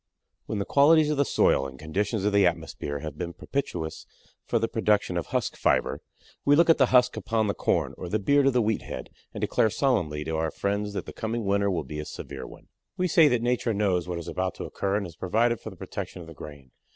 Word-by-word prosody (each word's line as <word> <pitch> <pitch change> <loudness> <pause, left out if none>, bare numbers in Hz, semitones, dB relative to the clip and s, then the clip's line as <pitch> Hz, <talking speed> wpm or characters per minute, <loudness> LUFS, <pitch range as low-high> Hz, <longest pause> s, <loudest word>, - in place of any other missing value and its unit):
When 110 - -3
the 100 - -1
qualities 150 +2 +5
of 150 - -1
the 140 - +3
soil 70 - +2
and 65 0 -11
conditions 100 - -2
of 105 - +1
the 100 -2 +5
atmosphere 80 -4 -3
have 75 -1 -7
been 85 -1 -4
propitious 90 - -4 0.4
for - - +2
the 115 0 +1
production 105 -5 +1
of 85 - -2
husk - - -1
fiber, - - +1 0.4
we 145 - +5
look 165 +2 +6
at 160 - +2
the 130 - +5
husk 125 0 +4
upon 110 -1 0
the 100 - 0
corn - - 0
or 90 - -5
the 110 - +1
beard 140 +7 +3
of 135 - +3
the 125 -2 +3
wheat 110 0 0
head - - -7 0.2
and - - -7
declare 110 - +2
solemnly 100 - 0
to 80 - -3
our 80 0 0
friends 100 +3 -2
that - - -4
the - - -8
coming 110 0 -3
winter 100 0 +2
will 90 -3 -1
be 75 -1 -7
a 75 - -4
severe - - -7
one. - - -14 0.3
We 185 - +1
say 165 -2 +6
that 125 -4 +1
Nature 120 -2 0
knows 95 -4 +1
what 90 -1 -3
is 85 0 -7
about 95 +1 -2
to - - -6
occur 100 0 -2
and 100 -1 -1
has 85 -2 -10
provided 115 +6 +1
for - - -7
the - - -12
protection - - -6
of 85 - -11
the 80 - -10
grain. 70 -3 -11
100 Hz, 245 wpm, -26 LUFS, 85-120 Hz, 0.4 s, look